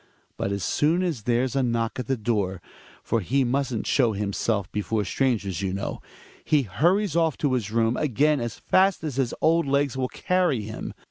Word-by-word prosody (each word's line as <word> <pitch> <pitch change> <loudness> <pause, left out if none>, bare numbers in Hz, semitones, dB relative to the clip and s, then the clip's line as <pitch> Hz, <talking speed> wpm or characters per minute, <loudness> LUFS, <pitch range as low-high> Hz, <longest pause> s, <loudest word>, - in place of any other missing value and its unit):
But 100 - -2
as 100 -1 -2
soon 165 +5 +2
as 165 -10 -2
there's 125 +1 +1
a 135 - +2
knock 115 -1 -1
at 125 - -4
the 135 -1 0
door 105 -5 -1 0.2
— - - -24
for 115 - 0
he 130 +8 +1
mustn't 130 -2 -1
show 120 -5 +2
himself 100 0 -1
before 105 0 -1
strangers 100 -8 0
you 95 -1 -2
know 100 - -4 0.2
— - - -22 0.2
he 150 -3 +2
hurries 170 - +1
off 165 -3 +2
to 145 -3 0
his 115 -5 -1
room 115 +1 +1
again 150 +2 +2
as 120 -2 -4
fast 190 -2 +2
as 145 -5 -4
his 130 -3 0
old 165 -1 +3
legs 140 -1 +1
will 130 -1 -1
carrj^ 180 -11 0
him. 110 +1 -6
125 Hz, 200 wpm, -25 LUFS, 110-145 Hz, 0.2 s, old